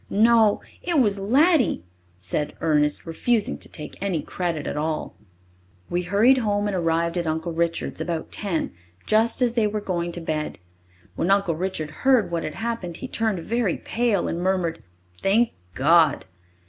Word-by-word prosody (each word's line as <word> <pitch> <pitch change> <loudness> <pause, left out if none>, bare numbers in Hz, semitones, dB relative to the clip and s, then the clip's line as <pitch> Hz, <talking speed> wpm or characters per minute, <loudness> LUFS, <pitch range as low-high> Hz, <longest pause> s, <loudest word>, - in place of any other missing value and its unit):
"No, 220 0 +4 0.2
it 345 -2 0
was 205 -5 +2
Laddie," 270 - +3 0.3
said 95 +11 -2
Ernest, 150 -2 +1
refusing 210 +7 0
to - - -9
take 150 - -9
any 195 -5 0
credit 170 -5 -3
at - - -3
all. 155 +1 -2 0.8
We 175 +1 +1
hurried 210 +9 +4
home 205 -3 0
and 205 -2 -1
arrived 170 0 0
at 170 - -3
Uncle 160 +2 -2
Richard's 170 0 -1
about 170 -2 -3
ten, 190 -6 -1 0.3
just 225 +3 +3
as 240 -2 +2
they 225 -3 +2
were 210 +1 -2
going 175 -4 -2
to 175 - -5
bed. 155 -2 -3 0.6
When 175 - -1
Uncle 195 -3 +3
Richard 165 -3 -3
heard 250 -9 +3
what 170 -1 -1
had 155 - -5
happened, 225 -7 -3
he - - -6
turned 220 -7 -1
very 225 -1 0
pale, 230 -5 0
and 170 - -3
murmured, 180 -3 0 0.4
"Thank 220 +5 +3 0.2
God!" 155 +1 +4
185 Hz, 160 wpm, -24 LUFS, 165-220 Hz, 0.8 s, No